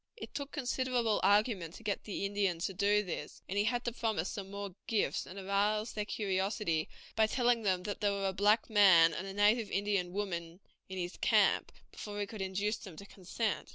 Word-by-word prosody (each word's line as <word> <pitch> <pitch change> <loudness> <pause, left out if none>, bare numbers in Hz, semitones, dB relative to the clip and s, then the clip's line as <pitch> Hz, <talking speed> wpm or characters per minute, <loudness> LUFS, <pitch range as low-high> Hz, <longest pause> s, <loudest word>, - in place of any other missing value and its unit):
It - - -9
took 280 -1 -5
considerable 250 -5 0
argument 200 -4 +2
to - - -12
get 205 -2 -2
the 200 -1 -3
Indians 195 -4 0
to 195 - -3
do 205 +2 +2
this, 180 - -6
and 190 - -4
he 205 +1 +2
had 240 +2 0
to 240 - 0
promise 220 -7 -2
them 195 -3 -6
more 200 -1 -6
gifts 220 -3 0
and 185 - -10
arouse 205 +3 0
their 210 -1 -2
curiosity 195 -5 -1 0.3
by 220 0 +4
telling 240 0 +2
them 185 -4 0
that 205 +1 -5
there 205 -1 +2
were 200 0 -2
a - - -4
black 210 +4 +3
man 185 -7 +6
and 185 +6 -4
a 195 - -6
native 210 +1 +3
Indian 195 -3 0
woman 175 -3 -4 0.3
in 190 - -6
his 175 0 -4
camp, - - +3 0.2
before 205 -1 -7
he 205 - 0
could 205 0 -8
induce 200 +3 -1
them 185 -6 -11
to 200 - -9
consent. 200 +3 -3
205 Hz, 205 wpm, -33 LUFS, 190-215 Hz, 0.3 s, man